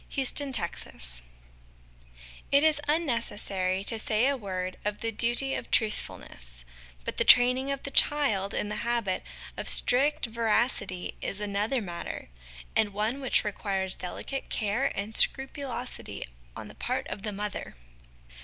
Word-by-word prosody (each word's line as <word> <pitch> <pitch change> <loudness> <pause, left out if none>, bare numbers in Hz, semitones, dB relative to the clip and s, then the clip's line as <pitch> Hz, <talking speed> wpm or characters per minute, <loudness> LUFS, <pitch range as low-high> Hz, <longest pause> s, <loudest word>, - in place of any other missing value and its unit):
TRUTHFULNESS 215 - -1 1.3
It 280 +1 +5
is 310 -2 +4
unnecessary 205 - 0
to 225 +2 0
say 220 +2 +1
a 280 - +2
word 185 -5 -4
of 210 0 -3
the 225 - -1
duty 240 +5 +1
of - - -4
Truthfulness; - - -2 0.4
but - - -4
the - - +3
training 250 +2 +6
of 275 - -3
the 280 - -5
child 245 -11 +3
in 205 - -1
the 210 - -3
habit 235 -6 -1 0.4
of - - -1
strict 290 +5 +4
veracity 225 -5 0
is 195 - -2
another 210 +5 0
matter, 170 - -6 0.5
and 205 -2 +2
one 220 +7 -1
which 265 - +2
requires 195 -2 0
delicate 225 +9 -5
care 215 +5 0
and 210 +2 -4
scrupulosity 265 -1 +1 0.3
on - - -7
the - - -11
part - - -2
of 205 - -5
the 210 +1 -3
mother. 205 0 -4
220 Hz, 135 wpm, -28 LUFS, 195-265 Hz, 1.3 s, training